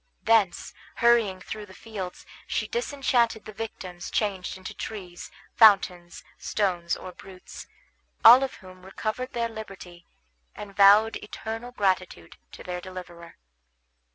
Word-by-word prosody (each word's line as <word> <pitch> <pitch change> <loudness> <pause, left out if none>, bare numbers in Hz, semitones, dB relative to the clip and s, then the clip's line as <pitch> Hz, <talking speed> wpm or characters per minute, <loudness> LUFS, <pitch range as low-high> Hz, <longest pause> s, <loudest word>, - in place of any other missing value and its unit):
Thence, 220 -5 +2 0.2
hurrying 230 -5 +3
through 210 +1 -7
the 190 - -14
fields, 195 -5 -7 0.2
she - - -1
disenchanted 260 - 0
the 215 - -9
victims 190 -5 -7
changed 195 -3 -2
into 185 -1 -8
trees, 185 -5 -8 0.2
fountains, 185 -5 +4 0.2
stones, 180 -5 -1
or 185 - -9
brutes; 185 0 -12 0.6
all 245 +3 +11
of 270 - -3
whom 185 -1 -15
recovered 215 +6 -4
their 235 -1 0
liberty, 195 -6 -10 0.5
and 200 -1 -9
vowed 205 +3 +6
eternal 225 +3 -7
gratitude 185 - -2
to - - -11
their 180 0 -5
deliverer. 175 -2 -10
200 Hz, 125 wpm, -26 LUFS, 185-225 Hz, 0.6 s, all